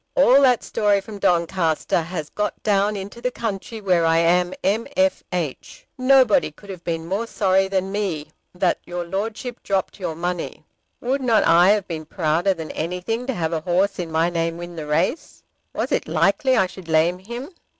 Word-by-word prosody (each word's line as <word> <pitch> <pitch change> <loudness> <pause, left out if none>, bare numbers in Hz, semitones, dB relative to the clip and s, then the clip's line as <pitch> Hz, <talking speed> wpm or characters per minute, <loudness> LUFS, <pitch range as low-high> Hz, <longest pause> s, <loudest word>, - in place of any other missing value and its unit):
All 275 0 +6
that 255 -3 +4
story 205 -1 +2
from 205 +1 -9
Doncaster 170 -2 +1
has 160 -2 -5
got 210 0 -3
down 205 0 +2
into 200 +4 -7
the 250 - 0
country 225 -2 -5
where 180 -4 +2
I 165 0 +3
am 175 +2 +3
M.F.H. 210 - -1
Nobody 265 +1 +4
could 200 -1 -12
have 180 -2 -9
been 165 -1 -3
more 200 +7 -2
sorry 195 -3 +2
than 190 0 -1
me 190 -7 -3 0.2
that 180 -1 +1
your 175 0 -5
Lordship 215 +6 -4
dropped 195 +1 -2
your 165 -4 -3
money. 175 +1 -4 0.4
Would 265 +3 -1
not 235 -4 +3
I 175 +3 +6
have 205 -2 +2
been 160 -2 -5
prouder 170 +4 +1
than 160 -2 -6
anything 180 +9 -3
to 265 - 0
have 165 -2 -1
a 160 - -1
horse 185 +4 +1
in 170 -2 -4
my 165 +2 +1
name 165 -1 -1
win 175 0 -8
the 155 -2 -6
race! 150 - -1 0.3
Was - - -3
it - - 0
likely 265 -4 +2
I - - +4
should 185 -1 -10
lame 165 +3 +2
him? 235 - -7
190 Hz, 180 wpm, -22 LUFS, 170-215 Hz, 0.4 s, All